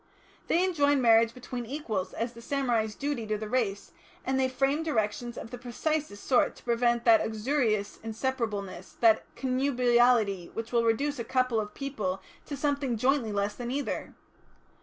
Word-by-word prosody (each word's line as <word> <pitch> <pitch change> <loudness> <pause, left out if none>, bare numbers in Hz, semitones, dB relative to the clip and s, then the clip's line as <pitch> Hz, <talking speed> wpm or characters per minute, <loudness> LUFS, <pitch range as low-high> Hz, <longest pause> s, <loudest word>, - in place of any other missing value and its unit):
They 355 +3 +3
enjoined 290 -6 +2
marriage 230 -1 +5
between 245 -1 -6
equals 220 -9 -3
as 230 +1 -3
the 235 - -12
samurai's 235 -5 0
duty 280 -6 -3
to 215 0 0
the 215 +1 -5
race, 210 -4 -1 0.3
and 265 0 +1
they 260 0 +2
framed 275 +4 +1
directions 240 -4 -1
of 225 - -7
the 245 - -7
precisest 255 -1 -3
sort 255 - +2
to - - -17
prevent 235 0 +1
that 230 -2 +7
uxorious 220 -2 0
inseparableness, 220 -5 -3
that 225 -2 +5
connubiality 245 -7 +2
which 225 0 -5
will 235 -1 +2
reduce 280 +5 +1
a - - -1
couple 255 -1 +1
of 210 -1 -5
people 215 -10 -3 0.3
to 285 - -5
something 280 -4 0
jointly 255 -1 +1
less 205 0 -1
than 240 +2 -6
either. 280 +3 -3
240 Hz, 160 wpm, -29 LUFS, 220-270 Hz, 0.3 s, that